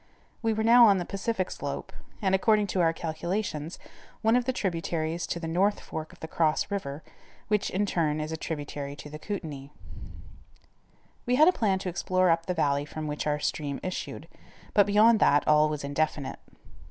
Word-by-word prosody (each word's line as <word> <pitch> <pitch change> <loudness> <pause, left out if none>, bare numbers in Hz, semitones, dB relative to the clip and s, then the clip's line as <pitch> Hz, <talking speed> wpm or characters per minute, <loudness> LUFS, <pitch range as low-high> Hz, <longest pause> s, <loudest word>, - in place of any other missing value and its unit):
We 225 -1 +1
were 220 0 0
now 235 +1 +8
on 200 -2 +5
the 175 - -2
Pacific 195 0 -2
slope, - - -5 0.3
and, 190 -1 +2
according 210 +2 +3
to 185 - +2
our 165 -1 +4
calculations, 165 0 -3
on - - -19 0.3
one 225 +1 +4
of 250 -1 +2
the 260 - +1
tributaries 170 -6 -2
to 170 - -3
the 165 - -5
north 190 +5 +1
fork 160 0 -7
of - - -19
the 160 - -5
Cross 160 +4 0
River, 155 -7 -4 0.5
which, 210 -2 +1
in 200 +3 0
turn, 155 -5 0
is 155 +1 -4
a - - -2
tributary 145 -3 -5
to 150 0 -10
the 150 - -7
Kootanie. 155 -8 -6 1.6
We 250 - +3
had 310 +4 +6
a - - +7
plan 200 - +1
to 185 - -4
explore 185 +1 +1
up 165 0 0
the 180 - -1
valley 140 -2 +1
from 155 +1 -6
which 150 0 -3
our 150 0 +1
stream 145 -2 -2
issued, 185 0 -5 0.5
but 205 -1 +5
beyond 215 +2 +5
that, 145 0 +4
all 150 0 +5
was 150 -2 -4
indefinite. 145 0 -2
170 Hz, 190 wpm, -28 LUFS, 150-205 Hz, 1.6 s, now